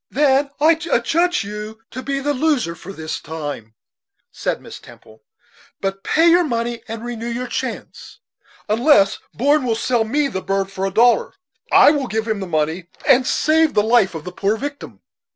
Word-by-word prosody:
"Then 280 0 +2
I 310 +3 +5 0.2
adjudge 340 +8 +1
you 210 +2 -7
to 255 - -6
be 275 +1 -3
a - - -3
loser 285 - 0
for 175 +3 -10
this 160 -4 -5
time," 145 -9 -7 0.6
said - - -3
Miss - - -11
Temple; 110 0 -17 0.6
"but 195 0 -4
pay 325 +2 +3
your 350 +1 +5
money 235 -4 -2
and 225 +1 -6
renew 235 -1 -5
your 240 +1 -3
chance; - - -6 0.5
unless 215 -2 +3 0.2
Brom 285 +4 +2
will 235 -3 0
sell 230 0 +1
me 280 +6 0
the 190 -8 -4
bird 195 0 -2
for 195 0 -2
a - - -4
dollar. 245 - +3 0.4
I - - +7
will 285 -4 -1
give 220 0 -2
him 215 -2 -1
the 190 - -5
money, 160 +2 -1 0.2
and 255 0 +5
save 315 0 +2
the 210 - +4
life 220 -5 +3
of 160 - -6
the 180 - -7
poor 200 +4 -1
victim." 285 +3 -7
230 Hz, 180 wpm, -20 LUFS, 195-280 Hz, 0.6 s, I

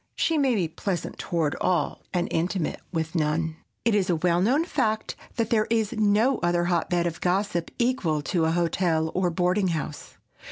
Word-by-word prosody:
She 330 - +1
may 275 -5 +3
be 180 -5 +1
pleasant 175 +2 -4
toward 165 -5 -1
all, 180 - 0
and 175 -2 0
intimate 170 +1 -1
with 160 -2 -2
none. 160 0 0 0.3
It 230 - +3
is 195 -3 +2
a 175 - +3
well 175 +1 +2
known 270 - +3
fact 220 -10 -1 0.2
that 230 -2 -1
there 215 -2 +3
is 225 -1 +1
no 215 +4 +3
other 175 0 +1
hotbed 175 0 +1
of 170 -1 -3
gossip 180 -2 0
equal 195 - 0
to 165 +3 +1
a 160 - +2
hotel 165 -1 +1
or 185 -1 +1
a - - -1
boarding 180 +3 +1
house. 155 -3 -4
180 Hz, 185 wpm, -26 LUFS, 165-215 Hz, 0.3 s, may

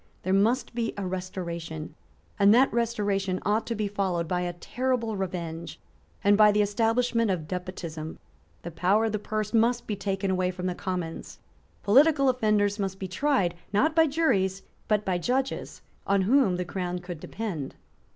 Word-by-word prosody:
There 185 - 0
must 225 +8 +2
be 230 -1 -2
a 200 - -3
restoration; 170 -4 -5 0.5
and 200 0 +6
that 260 +2 +4
restoration 205 -5 0
ought 210 +3 +1
to 230 - -2
be 210 -1 -1
followed 190 -4 -1
by 180 0 0
a 175 0 -2
terrible 240 +4 -2
revenge 170 -3 -5 0.4
and 205 0 +5
by 210 0 +7
the 210 0 +3
establishment 230 +2 +1
of 170 -5 -2
despotism. 170 -3 -5 0.5
The 170 - -6
power 190 +7 +2
of 220 - 0
the 215 - -1
purse 215 +1 -3
must 235 +2 +2
be 210 - -2
taken 195 0 -2
away 185 -1 +1
from 180 0 -5
the 180 - 0
Commons. 180 -3 -5 0.5
Political 275 +5 +5
offenders 215 -4 +1
must 190 -1 -2
be 190 - -5
tried, 195 -3 +1 0.2
not 310 +10 +2
by 325 -1 +5
juries, 195 - +1 0.2
but 210 -1 +1
by 180 -2 0
judges 260 +7 -2 0.2
on 195 -1 +3
whom 220 -3 +3
the 180 0 -2
Crown 180 0 -3
could 175 -2 -7
depend. 175 -9 -5
200 Hz, 170 wpm, -27 LUFS, 180-225 Hz, 0.5 s, by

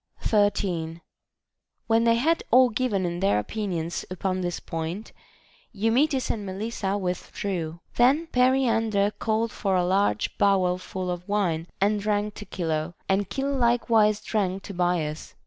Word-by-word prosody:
13. 185 -6 0 0.9
When 225 0 +3
they 230 0 +5
had 320 +8 +2
all 255 +1 +6
given 215 -5 0
in 175 0 -3
their 195 - +2
opinions 170 - -3
upon 185 +1 -2
this 175 -1 -2
point, 165 +6 -5 0.6
Eumetis 250 +6 +2
and 210 - -4
Melissa 200 0 -3
withdrew. 180 -2 -4 0.2
Then 270 +7 +4
Periander 230 -7 +2
called 225 0 0
for 195 -2 -1
a 180 -1 +2
large 185 - +1
bowl 185 -2 +3
full 185 0 -4
of 180 +2 -6
wine, 175 -6 0
and 205 +1 +2
drank 210 0 0
to 210 - -9
Chilo; 165 -2 -3
and 195 0 +1
Chilo 275 +1 -1
likewise 230 -4 +3
drank 195 -3 -1
to 200 - -7
Bias. 175 -4 -1
200 Hz, 140 wpm, -26 LUFS, 180-225 Hz, 0.9 s, all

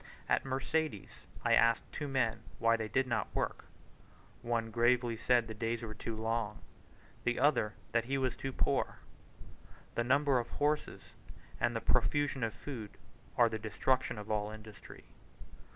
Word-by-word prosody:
At - - +2
Mercedes 135 -2 -1 0.3
I - - +4
asked 115 0 +5
two 145 - -4
men 120 -5 +1 0.2
why 115 0 +4
they 110 -1 -2
did 130 +6 +1
not 120 -3 0
work. - - -2 0.8
One 115 -1 -1
gravely 120 +1 +3
said 120 +1 +3
the 110 - -5
days 115 +2 -2
were 110 -1 -5
too 110 +2 -5
long; 110 -1 -2 0.6
the 120 0 +1
other 125 -6 +3 0.2
that 115 0 +2
he 135 +3 0
was 130 -2 0
too 135 - -4
poor. - - 0 1.0
The 120 - 0
number 140 +1 +3
of 120 - -4
horses 150 +1 -1 0.6
and - - +1
the - - -1
profusion 145 -3 +2
of 115 - -1
food 115 -8 -7 0.4
are 120 - +7
the 110 -1 -3
destruction 115 +3 0
of 105 +1 -6
all 105 -1 0
industry. 110 -1 -11
115 Hz, 155 wpm, -33 LUFS, 110-130 Hz, 1.0 s, are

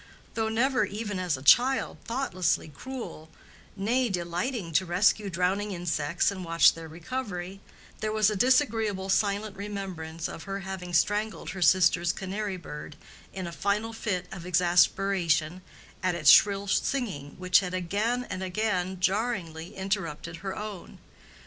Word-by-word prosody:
Though 220 -1 -1
never 250 +2 +2
even 205 -1 -4
as 180 -6 0
a 130 - -11
child 255 - +4
thoughtlessly 210 -12 0
cruel, 195 - -8 0.5
nay 235 +5 +1
delighting 175 +3 -3
to 155 - +3
rescue 200 +3 +2
drowning 190 +3 0
insects 170 0 0
and 190 -2 -6
watch 165 -1 +5
their 165 -1 -9
recovery, 185 +1 -5 0.4
there 215 - -2
was 215 -1 +3
a - - -2
disagreeable 220 -5 +2
silent 200 +1 +1
remembrance 190 -5 -5
of 165 - -8
her 195 0 -4
having 185 -2 -5
strangled 205 -1 0
her 190 0 -7
sister's 175 -1 +4
canary 195 0 -4
bird 150 -3 -9 0.4
in 190 -1 -5
a 170 - -5
final 205 +6 -1
fit 195 -5 -2
of 180 -3 -7
exasperation 175 -1 +2 0.4
at 185 -2 +1
its 155 -4 +6
shrill 200 -1 +5
singing 195 - -1
which 180 0 +4
had 185 -2 -3
again 210 +8 -1
and 185 0 -5
again 185 -1 -1
jarringly 185 -5 -1
interrupted 170 -4 -3
her 190 +1 -5
own. 210 -3 -7
190 Hz, 145 wpm, -28 LUFS, 175-210 Hz, 0.5 s, its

